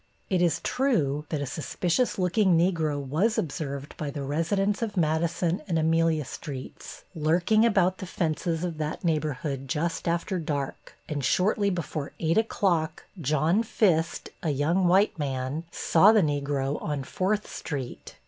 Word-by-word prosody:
It 185 -2 +2
is 175 -2 +2
true 155 - 0
that 150 -3 -2
a - - -2
suspicious 175 - -1
looking 185 -1 +3
Negro 165 -4 +1
was 155 - 0
observed 140 -2 -4
by 150 - -3
the 140 -1 -5
residents 195 - 0
of 215 -3 -3
Madison 165 +2 +1
and 170 -4 0
Amelia 160 -1 +2
Streets 130 -1 -8
lurking 175 +8 +3
about 190 -4 +2
the 190 - -6
fences 165 0 -1
of 170 -3 -3
that 155 0 -3
neighborhood 150 -4 -1
just 165 +6 -2
after 170 +3 0
dark, 145 -4 -4
and 145 -3 -3
shortly 200 +6 +2
before 160 -5 -4
8 165 +5 +2
o'clock 175 -8 0 0.2
John 155 - +2
Fist, 175 -7 +1
a 165 - -1
young 160 +6 +2
white 190 0 +3
man, 135 +2 -2
saw 170 +4 +5
the 220 -2 +5
Negro 145 -1 -1
on 145 -3 -2
Fourth 205 +8 -1
Street. 135 -6 -6
165 Hz, 150 wpm, -27 LUFS, 145-185 Hz, 0.2 s, saw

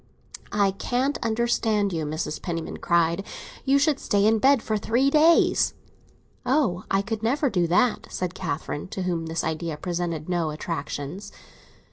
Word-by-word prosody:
"I 200 -1 +2
can't 250 +8 -1
understand 220 -3 +1
you!" 160 -2 -2
Mrs. 155 0 -3
Penniman 165 -3 -4
cried. 170 +2 +1 0.4
"You 275 +1 +4
should 285 0 +2
stay 205 0 +1
in 220 +1 +4
bed 270 0 +4
for 220 - -1
three 240 +6 +1
days." 315 +3 +4 0.7
"Oh, 250 -10 +1
I 195 0 +2
could 220 0 -4
never 265 +4 +1
do 175 -3 +1
that!" 220 +8 +2
said 180 -1 -3
Catherine, 155 -4 -4
to 190 0 -4
whom 170 -3 -2
this 165 0 -2
idea 160 0 -3
presented 170 -2 -3
no 175 -3 0
attractions. 155 +2 -5
195 Hz, 150 wpm, -25 LUFS, 165-235 Hz, 0.7 s, You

